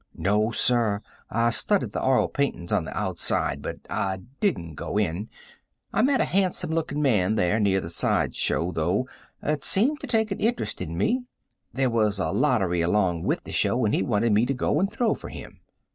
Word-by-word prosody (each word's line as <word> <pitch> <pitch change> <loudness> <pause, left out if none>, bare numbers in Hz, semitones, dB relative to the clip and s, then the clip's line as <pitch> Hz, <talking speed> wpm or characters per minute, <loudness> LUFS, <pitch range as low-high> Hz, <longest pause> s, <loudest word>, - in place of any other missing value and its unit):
"No, 105 +5 +1
sir. 115 -3 +2 0.3
I 115 +1 +1
studied 155 - +1
the - - -3
oil 130 -1 +3
paintings 140 -11 -2
on - - +1
the - - -6
outside, - - 0
but - - -6
I 95 -1 -2 0.2
didn't 85 - -1
go 90 - -4
in, 100 +1 -1 0.6
I - - +2
met 265 +2 +3
a - - +3
handsome 180 -3 0
looking 155 -2 -1
man 110 -6 +2
there 105 +1 +1
near 100 -2 +2
the 85 - -6
side - - 0
show, 85 +3 0
though, 90 +9 0 0.4
that 150 -1 -1
seemed 270 +10 +3
to 280 - -7
take 220 -3 +1
an 195 - -3
interest 235 +2 -1
in 85 +1 -4
me. 245 - 0 0.5
There 130 0 0
was 110 -3 +1
a 95 - -1
lottery 100 - +1
along 90 -1 +1
with - - 0
the - - -9
show 120 -1 +1
and 105 - +1
he - - +2
wanted 105 +2 +1
me 110 +4 +3
to 135 - -1
go 140 +4 0
and 195 +2 +1
throw 230 -1 +1
for - - -8
him." - - -10
115 Hz, 200 wpm, -25 LUFS, 95-155 Hz, 0.6 s, oil